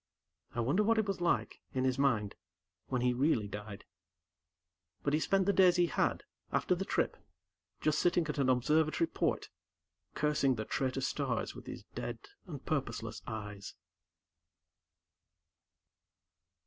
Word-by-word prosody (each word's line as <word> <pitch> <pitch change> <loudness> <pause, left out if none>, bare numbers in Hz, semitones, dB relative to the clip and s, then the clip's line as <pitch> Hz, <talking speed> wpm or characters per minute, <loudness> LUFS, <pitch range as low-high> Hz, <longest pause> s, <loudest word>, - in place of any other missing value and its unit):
I 120 - +1
wonder 140 - +2
what 225 +2 +3
it 220 - +3
was 195 -3 -3
like, 175 - +1 0.2
in 130 - +1
his 130 0 +1
mind, 110 -8 +2 0.5
when 125 -2 -1
he 125 0 +3
really 125 -5 +2
died. 105 0 -7 1.2
But 145 - +1
he 155 - +4
spent 195 +3 +2
the 200 - +3
days 185 -2 +6
he 175 -1 +4
had, - - 0 0.3
after - - +2
the - - -2
trip, - - 0 0.6
just 150 -1 +2
sitting 175 -1 +3
at 150 - -3
an 135 -2 +3
observatory 155 +6 +3
port, - - -1 0.7
cursing 145 -3 +2
the 110 -1 -4
traitor 135 +2 -1
stars 130 - -1
with - - -11
his - - -7
dead - - -4 0.3
and 145 -6 -8
purposeless 115 -6 -2
eyes. 105 -3 -6
140 Hz, 140 wpm, -33 LUFS, 120-165 Hz, 1.2 s, days